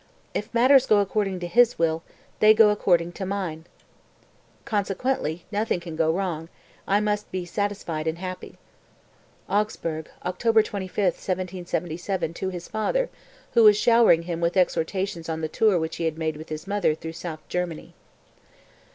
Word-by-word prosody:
If 210 - -3
matters 255 +2 +5
go 215 - +5
according 200 -1 0
to 175 - -3
His 240 +5 +4
will 160 -1 +1 0.4
they 215 0 +7
go 215 -1 +6
according 175 -4 +2
to 185 - -6
mine; 185 -5 -3 1.0
consequently 200 - -1
nothing 210 -2 0
can 170 -2 -8
go 160 0 +2
wrong, 165 -3 -3 0.4
I 200 +1 +3
must 210 0 -1
be 185 -1 -3
satisfied 175 -5 -3
and 160 +1 -1
happy." 185 0 -7 0.9
(Augsburg, 170 -6 -2 0.2
October 220 +4 +3
25, 200 -1 -4
1777, 180 -1 -2
to 190 +2 -3
his 175 -2 -7
father, - - -1 0.4
who 235 -2 +5
was 210 -1 +8
showering 230 -7 +5
him 170 -1 -4
with 170 +2 0
exhortations 180 0 0
on 160 0 -3
the 160 - -1
tour 205 +4 +2
which 160 -1 -3
he 165 -1 +1
made 160 0 -3
with 155 +2 -10
his 155 +1 -5
mother 200 -6 +1
through 160 +1 -7
South 160 -2 -7
Germany.) 180 -3 -4
185 Hz, 150 wpm, -25 LUFS, 165-210 Hz, 1.0 s, was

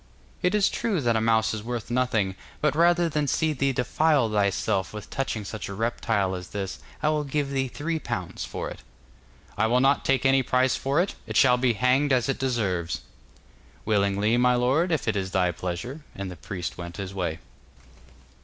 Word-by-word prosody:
'It 180 +2 +2
is 205 -2 +4
true 210 -7 -1
that 120 -4 +1
a 110 - +2
mouse 110 0 +2
is 110 - -4
worth 120 +1 -5
nothing, 120 -6 +1 0.3
but 150 -1 +1
rather 170 +1 +4
than 150 -2 -1
see 160 +2 +1
thee 140 0 +1
defile 135 0 +2
thyself 100 -2 0
with 105 - -8
touching 115 -6 -2
such 105 -1 -6
a 100 - -5
reptile 110 -3 0
as 90 -1 -5
this, 100 -2 -5 0.2
I 155 - +4
will 155 -1 +1
give 145 0 -2
thee 135 -1 0
three 160 +5 -3
pounds 120 - -4
for - - -4
it.' - - -9 0.8
'I 110 - +4
will 125 +2 +3
not 135 +2 +3
take 135 -1 +1
any 135 0 +5
price 130 0 +2
for 140 +4 0
it. 185 +3 +1
It - - -1
shall 125 -2 +6
be 125 -1 +2
hanged 130 +5 +2
as 125 -1 +3
it 135 - -1
deserves.' 100 -10 -1 0.8
'Willingly, 105 +1 +2
my 125 0 +4
lord, 135 +9 +2
if 155 -7 0
it 110 - +1
is 95 -2 -1
thy 90 -1 +2
pleasure.' 90 - -5
And 100 -1 -5
the - - -7
priest 85 +2 -6
went 85 0 -7
his 95 -1 -5
way. 90 -4 -2
120 Hz, 195 wpm, -26 LUFS, 100-140 Hz, 0.8 s, shall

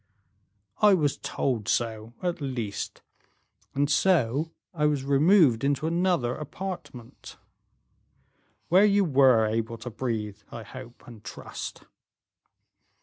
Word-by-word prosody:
"I 210 -2 +7
was 150 -5 0
told 120 -6 -2
so, 115 0 -2
at 175 -3 -2
least; 120 -7 -4 0.7
and 140 +1 +2
so 155 -3 +2 0.2
I 150 -3 +1
was 145 -3 0
removed 140 - +4
into 140 +2 0
another 170 -7 +1
apartment." 155 -6 -8 1.3
"Where 185 +4 +6
you 205 -1 +4
were 130 -7 +5
able 115 +1 -2
to 125 - -7
breathe, 110 -3 -3
I 115 - -7
hope 125 0 -11
and 115 -3 -13
trust?" - - -8
135 Hz, 110 wpm, -27 LUFS, 115-165 Hz, 1.3 s, I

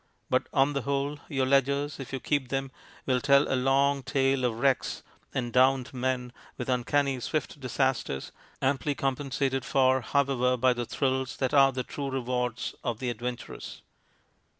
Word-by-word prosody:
But - - +2
on 135 +2 +3
the 140 - -1
whole 140 +2 -2
your 135 -4 +1
ledgers, 140 +2 +1
if 135 - -7
you 135 - -3
keep 145 0 0
them, 135 0 -2 0.3
will 130 -1 +1
tell 140 +2 +5
a - - -1
long 135 +2 +2
tale 135 0 +1
of 115 -2 -1
wrecks 135 +2 +1 0.3
and 120 -2 -3
drowned 130 0 +3
men 125 -1 -2 0.2
and 125 - -4
uncanny 130 +2 +1
swift 145 +5 -3
disasters, 130 - -1 0.3
amply 140 +2 +1
compensated 135 0 -1
for, 130 0 +3
however, 125 -1 +1
by 130 +1 +4
the 120 -1 -4
thrills 130 0 -1
that 130 -2 -1
are 135 -1 +6
the 130 -1 -3
true 140 +2 -5
rewards 125 -2 -2
of 120 -3 -2
the 125 0 -2
adventurous. 120 +1 -6
130 Hz, 160 wpm, -28 LUFS, 125-140 Hz, 0.3 s, are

